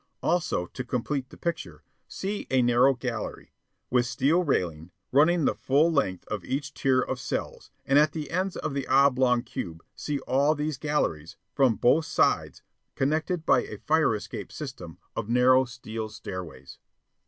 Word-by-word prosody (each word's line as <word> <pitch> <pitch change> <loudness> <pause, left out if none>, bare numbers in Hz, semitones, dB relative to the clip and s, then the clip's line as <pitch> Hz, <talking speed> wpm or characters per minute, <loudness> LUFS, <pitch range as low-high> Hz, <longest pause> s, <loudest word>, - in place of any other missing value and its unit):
Also, 165 - 0
to 125 - -7
complete 125 +2 -2
the - - -14
picture, 160 - -4 0.2
see 200 +2 -4
a 130 -1 +3
narrow 120 +3 +4
gallery, 120 -3 -5 0.4
with 125 -1 +3
steel 145 +8 +2
railing, 85 - -1 0.2
running 155 +3 +4
the - - +3
full 150 +5 +2
length 95 - 0
of 105 -4 -4
each 140 - -3
tier 130 -2 +2
of 130 0 -3
cells 130 - -4 0.2
and 140 +1 +5
at 150 +1 +4
the 155 -2 -6
ends 185 +2 -1
of 145 - -3
the 140 -1 -3
oblong 130 -3 +4
cube 80 -2 -6
see 150 -1 -3
all 140 +4 +2
these 150 -2 -3
galleries, 135 - -1 0.2
from 130 -5 +3
both 150 +9 +3
sides, - - +1 0.3
connected 155 +4 0
by - - +4
a - - -8
fire 155 -7 +2
escape 105 - -7
system - - -8 0.2
of 105 - -4
narrow 130 +2 +5
steel 115 -3 -6
stairways. 80 -11 -8
130 Hz, 160 wpm, -27 LUFS, 120-150 Hz, 0.4 s, and